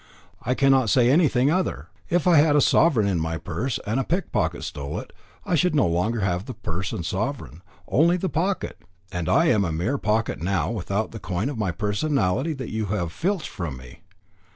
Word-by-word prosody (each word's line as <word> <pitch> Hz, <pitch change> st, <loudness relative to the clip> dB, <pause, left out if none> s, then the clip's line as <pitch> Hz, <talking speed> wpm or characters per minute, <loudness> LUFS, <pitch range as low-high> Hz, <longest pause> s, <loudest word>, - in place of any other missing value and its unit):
"I 125 Hz, -, -1 dB
cannot 135 Hz, -4 st, +3 dB
say 125 Hz, +1 st, +4 dB
anything 140 Hz, -3 st, +3 dB
other. 185 Hz, +2 st, -1 dB, 0.2 s
If 175 Hz, -2 st, +1 dB
I 175 Hz, -3 st, +6 dB
had 145 Hz, 0 st, +5 dB
a -, -, +5 dB
sovereign 140 Hz, -6 st, +4 dB
in 95 Hz, -4 st, 0 dB
my 80 Hz, 0 st, -2 dB
purse, 110 Hz, +10 st, -3 dB
and 110 Hz, +6 st, 0 dB
a -, -, +1 dB
pickpocket 175 Hz, +6 st, -1 dB
stole 70 Hz, +1 st, -5 dB
it, -, -, -11 dB, 0.3 s
I -, -, -2 dB
should 175 Hz, 0 st, +2 dB
no 145 Hz, -, +4 dB
longer 95 Hz, +7 st, 0 dB
have 90 Hz, 0 st, -1 dB
the 130 Hz, -, -7 dB
purse 95 Hz, -3 st, -4 dB
and 85 Hz, -, -4 dB
sovereign, 105 Hz, -, -3 dB, 0.3 s
only 170 Hz, +6 st, +3 dB
the 190 Hz, -, -2 dB
pocket; 185 Hz, +4 st, -2 dB, 0.3 s
and 90 Hz, -3 st, -3 dB
I 170 Hz, -, +4 dB
am 105 Hz, -4 st, +3 dB
a 85 Hz, -, -1 dB
mere 95 Hz, -, -1 dB
pocket 105 Hz, -8 st, 0 dB
now 90 Hz, 0 st, 0 dB
without 105 Hz, 0 st, -2 dB
the 115 Hz, -, -7 dB
coin 95 Hz, +7 st, -2 dB
of 135 Hz, -6 st, -5 dB
my 105 Hz, -3 st, 0 dB
personality 105 Hz, -, 0 dB
that 130 Hz, -5 st, -6 dB
you 110 Hz, -1 st, -2 dB
have 90 Hz, -4 st, -2 dB
filched 185 Hz, -, -2 dB
from 85 Hz, -9 st, -5 dB
me. 60 Hz, -1 st, -13 dB
110 Hz, 200 wpm, -24 LUFS, 90-145 Hz, 0.3 s, I